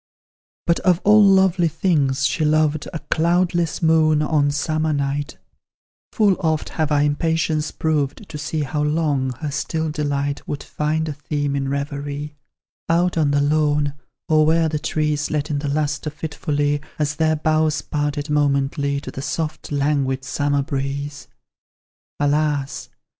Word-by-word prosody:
But 170 - +2
of 180 -2 +3
all 210 +1 +6
lovely 190 -3 +4
things, 145 -5 +1
she 155 - 0
loved 155 0 +2
A 165 - -4
cloudless 170 0 +1
moon, 155 -1 +4
on 150 -2 +2
summer 155 +1 0
night, 140 +1 -2 0.7
Full 205 -3 +3
oft 160 -3 0
have 155 -2 -2
I 145 -1 +3
impatience 155 +1 0
proved 155 +3 -1
To - - -10
see 150 +2 -2
how 150 +2 -2
long 150 -3 0
her 150 -2 -2
still 160 +2 -2
delight 145 -1 -2
Would 145 - -4
find 155 +1 -1
a 150 - -3
theme 145 0 -2
in 135 -1 -1
reverie, 145 +1 -4 0.5
Out 175 +2 +2
on 155 -3 +2
the 145 0 +2
lawn, 145 -1 +2 0.3
or 155 -1 +4
where 160 +1 +3
the 155 -1 -2
trees 150 -1 -1
Let 150 0 -2
in 145 - 0
the 145 - -3
lustre 150 +1 -1
fitfully, 145 -1 -2 0.2
As 150 -1 -1
their 160 -1 +2
boughs 155 0 +1
parted 145 0 -2
momently, 140 -1 +1
To - - -7
the 135 - -6
soft, 155 +2 -4
languid, 140 -2 0
summer 145 +1 0
breeze. 140 +1 -4 0.9
Alas! 145 -1 0
150 Hz, 145 wpm, -21 LUFS, 145-160 Hz, 0.9 s, all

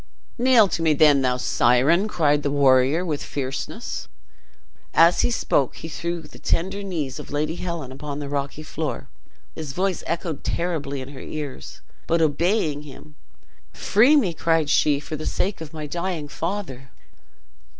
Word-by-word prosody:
"Kneel 245 -4 +6
to 170 - -2
me 160 -2 +3
then, 145 -2 +5
thou 125 -1 +1
siren!" 130 - +3
cried 150 -7 +2
the 145 - -1
warrior, 140 +3 +3
with 150 -4 -2
fierceness. 140 - -5 0.9
As 170 +1 +6
he - - +2
spoke 140 - +1
he - - -7
threw 170 +1 -4
the 150 - -14
tender 190 +4 -1
knees 160 -9 -4
of - - -9
Lady 150 +2 -1
Helen 170 -7 -4
upon 140 +2 -6
the 145 -1 -5
rocky 140 +1 -3
floor. 155 -4 -4 0.4
His 150 -3 -6
voice 185 +1 -1
echoed 165 -3 -3
terribly 150 -6 -2
in 130 - -8
her 140 - -10
ears, 145 - -7 0.3
but 170 - +2
obeying 160 0 +1
him, 150 +1 -12 0.6
"Free 240 +9 +4
me," 210 - +3
cried 160 -2 +1
she, 145 -2 +3
"for 155 +1 -6
the 155 +1 -5
sake 195 -2 -1
of 155 -2 -7
my 155 -2 -6
dying 170 0 -3
father!" 160 -6 -5
155 Hz, 160 wpm, -23 LUFS, 140-170 Hz, 0.9 s, Kneel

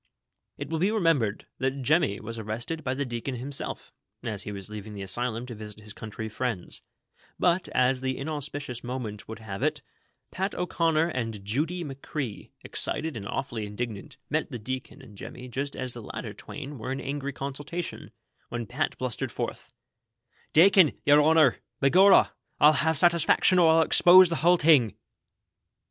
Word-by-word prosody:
It - - -6
will 160 -1 -1
be 190 +5 +3
remembered 165 - +1
that 135 +1 -1
Jemmy 135 - +2
was 115 +1 -7
arrested 115 +9 -4
by 130 0 -1
the 140 +1 -1
deacon 120 +2 -4
himself, 135 +3 -5 0.3
as 110 -4 -4
he 105 - -6
was 100 -1 -6
leaving 105 0 -8
the 100 - -5
Asylum 120 +4 -2
to 125 - -7
visit 105 -1 -9
his 105 0 -11
country 110 0 -6
friends; 110 -4 -3 0.6
but, 180 0 +2
as 125 +1 +2
the 130 0 -2
inauspicious 140 -4 -4
moment 120 -5 -5
would 110 - -7
4iave 105 -3 -7
it, - - 0 0.5
Pat 190 +2 -2
O'Conner 165 -2 +1
and 115 -8 -4
Judy 155 - -1
McCrea, 135 -4 -5
excited 160 -3 -3
and 100 -3 -6
awfully 115 -3 -3
indignant, 105 0 -5
met - - -1
the - - -5
deacon 130 +4 -6
and 105 -5 -14
Jemmy 125 +5 -9
just 140 +3 -4
as 130 -2 -4
the 120 - -8
latter - - -6
twain 145 -2 -8
were 125 +4 -4
in 135 - -2
angry 140 0 -3
consultation, 145 +6 -5 0.4
when 120 -1 -4
Pat 135 +7 -2
blus 125 -3 -3
tered - - -2
forth: - - -5 0.8
"Dacon, 180 -1 +6
yer 145 +1 +7
honor, 155 -4 +5 0.2
by 135 0 +3
gorrah! 190 +2 +7 0.3
I'll 150 +1 +7
have 155 +3 +2
satesfaction, 175 +2 +4
or 165 - +6
I'll 165 0 +5
expose 180 +2 +7
the 165 - -1
whole 175 +5 +4
ting." 150 - +4
130 Hz, 170 wpm, -27 LUFS, 115-155 Hz, 0.8 s, yer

